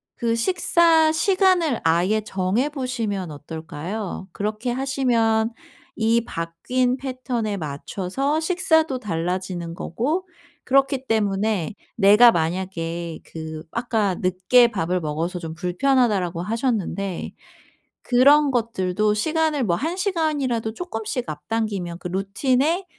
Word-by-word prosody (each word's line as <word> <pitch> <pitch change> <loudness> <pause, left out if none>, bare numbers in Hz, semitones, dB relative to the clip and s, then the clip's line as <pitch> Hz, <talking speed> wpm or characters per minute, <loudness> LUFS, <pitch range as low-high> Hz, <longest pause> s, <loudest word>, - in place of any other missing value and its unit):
그 230 -1 0
식사 330 +2 +3
시간을 365 - +2
아예 175 +7 +2
정해 200 +5 0
보시면 230 - -3
어떨까요? 160 +7 -6
그렇게 215 +4 -3
하시면 240 -4 +1 0.4
이 230 +1 +2
바뀐 245 +11 -1
패턴에 255 -5 -3
맞춰서 190 - -2
식사도 320 -5 +2
달라지는 180 -3 -3
거고. 300 - -2 0.4
그렇기 270 0 +2
때문에 205 -4 0 0.2
내가 210 +3 +7
만약에 170 -1 -3
그 160 -1 -7
아까 225 -4 0
늦게 185 +8 +4
밥을 180 -4 -1
먹어서 165 +3 -3
좀 160 -2 -6
불편하다라고 185 -1 +1
하셨는데 205 -4 -2 0.7
그런 280 +4 +5
것들도 215 -4 0
시간을 310 +4 +1
뭐 175 -7 +1
1 330 +5 -2
시간이라도 300 - -1
조금씩 245 - -4
앞당기면 180 +2 -3
그 180 - -5
루틴에 255 - 0
220 Hz, 255 characters per minute, -23 LUFS, 180-265 Hz, 0.7 s, 내가